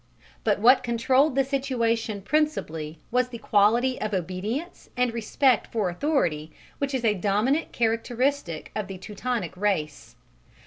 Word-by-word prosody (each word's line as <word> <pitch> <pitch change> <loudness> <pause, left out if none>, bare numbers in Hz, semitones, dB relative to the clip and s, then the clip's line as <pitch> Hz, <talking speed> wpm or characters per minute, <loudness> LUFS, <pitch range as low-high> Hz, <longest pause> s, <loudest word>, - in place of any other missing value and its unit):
But 210 -2 +2
what 250 +5 +6
controlled 255 +4 +2
the 270 - +4
situation 230 -6 -1
principally 165 - -1
was 250 +1 +2
the 245 -2 -8
quality 230 +4 +2
of 215 -2 -1
obedience 190 - -4
and 250 -2 +1
respect 235 +2 +2
for 210 -5 0
authority 175 - 0 0.3
which 280 -1 -1
is 245 -2 -1
a 215 - +4
dominant 210 - 0
characteristic 230 - -1
of 215 -2 -2
the 195 - -7
Teutonic 210 0 -4
race. 155 - -2
230 Hz, 135 wpm, -26 LUFS, 195-260 Hz, 0.3 s, what